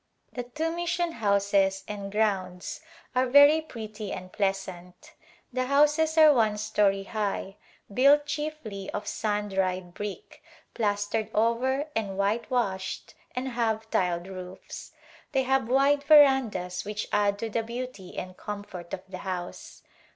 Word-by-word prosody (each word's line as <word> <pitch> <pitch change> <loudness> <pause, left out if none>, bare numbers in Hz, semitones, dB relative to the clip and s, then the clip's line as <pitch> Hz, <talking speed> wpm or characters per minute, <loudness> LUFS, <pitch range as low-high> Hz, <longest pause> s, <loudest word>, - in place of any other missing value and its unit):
The 250 - -3
two 300 +7 -3
mission 345 0 -1
houses 200 -4 +1
and 200 -1 -6
grounds 195 -3 -1 0.3
are 255 +1 +3
very 285 +4 +7
prettv 220 -7 -7
and 185 0 -11
pleasant. 190 -3 -3 0.4
The 255 0 0
houses 300 +4 +3
are 310 -2 +8
one 220 -5 +2
story 205 -2 +1
high 200 -1 -3 0.4
built 285 +5 +5
chieflv 290 -10 -5
of 205 - -4
sun 210 0 -2
dried 185 -2 -1
brick, 205 0 -7 0.3
plastered 205 0 -1
over 250 +6 +1
and 200 -4 -2
whitewashed 200 -2 -1 0.2
and 255 +1 -2
have 225 -2 -1
tiled 175 -1 0
roofs. 185 -1 -9 0.4
They 265 -1 +2
have 265 -2 +1
wide 275 +2 +4
verandas 265 - +4
which 210 +1 -4
add 205 -1 +2
to 225 +1 -4
the 230 - 0
beauty 235 -5 -7
and 185 0 -5
comfort 200 -5 -6
of 185 - -14
the 185 -1 -8
house. 180 -2 -6
215 Hz, 135 wpm, -27 LUFS, 195-260 Hz, 0.4 s, are